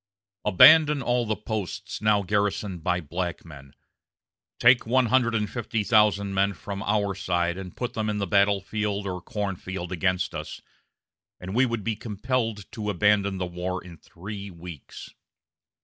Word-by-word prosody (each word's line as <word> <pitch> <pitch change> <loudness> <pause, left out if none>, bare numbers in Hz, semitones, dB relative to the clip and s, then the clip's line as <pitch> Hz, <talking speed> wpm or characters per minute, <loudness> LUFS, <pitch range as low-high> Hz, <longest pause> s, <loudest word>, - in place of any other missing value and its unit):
Abandon 150 - +7
all 120 -1 0
the 110 - 0
posts 105 -3 -5
now 105 -1 +3
garrisoned 100 -2 -1
by 90 0 0
black 85 +3 -4
men, 70 -4 -13 0.8
take 120 -1 +5
one 130 +2 +3
hundred 120 -1 +2
and 105 -1 0
fifty 115 -1 -3
thousand 100 -2 +3
men 100 +1 +2
from 100 +2 -7
our 100 -1 0
side 85 -2 -1
and 95 -2 -9
put 125 -1 -3
them 110 -2 -2
in 105 - -1
the 100 - -1
battle 100 +1 +3
field 105 0 -3
or 90 -2 -4
corn 100 0 -3
field 90 -1 -6
against 90 0 0
us, - - -6 0.8
and 95 +1 -7
we 130 +3 +3
would 115 -3 -3
be 110 +1 -1
compelled 110 0 -2
to 105 -2 -4
abandon 100 0 +2
the 90 - -2
war 90 +1 -4
in 90 -2 -11
three 100 +5 -9
weeks.... 85 -4 -10
100 Hz, 165 wpm, -25 LUFS, 90-110 Hz, 0.8 s, Abandon